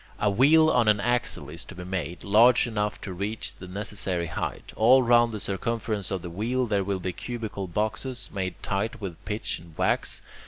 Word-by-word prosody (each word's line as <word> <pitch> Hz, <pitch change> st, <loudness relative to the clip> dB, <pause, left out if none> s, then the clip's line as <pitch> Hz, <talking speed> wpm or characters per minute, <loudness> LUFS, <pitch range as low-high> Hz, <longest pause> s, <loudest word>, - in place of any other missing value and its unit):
A 105 Hz, -, +2 dB
wheel 155 Hz, +8 st, +5 dB
on 120 Hz, -3 st, +3 dB
an 105 Hz, -1 st, +4 dB
axle 120 Hz, +2 st, -1 dB
is -, -, -6 dB
to -, -, -11 dB
be 90 Hz, -, -7 dB
made, 90 Hz, -2 st, -4 dB
large 115 Hz, +5 st, +5 dB
enough 105 Hz, -3 st, -2 dB
to 95 Hz, -, -5 dB
reach 100 Hz, +5 st, -3 dB
the 95 Hz, -, -11 dB
necessary 95 Hz, -2 st, -2 dB
height. 80 Hz, -, -5 dB
All 130 Hz, +4 st, +6 dB
round 120 Hz, -1 st, +5 dB
the 105 Hz, -, -4 dB
circumference 105 Hz, 0 st, -2 dB
of 95 Hz, -3 st, -3 dB
the 90 Hz, -, -5 dB
wheel 120 Hz, +8 st, 0 dB
there 100 Hz, -4 st, +1 dB
will 95 Hz, 0 st, -2 dB
be 90 Hz, 0 st, -3 dB
cubical 110 Hz, -5 st, -5 dB
boxes, 110 Hz, +7 st, -2 dB
made 95 Hz, -2 st, -2 dB
tight 105 Hz, +4 st, -2 dB
with 95 Hz, -6 st, -7 dB
pitch 105 Hz, +1 st, -2 dB
and 85 Hz, -2 st, -16 dB
wax. -, -, +1 dB
105 Hz, 195 wpm, -26 LUFS, 95-115 Hz, -, All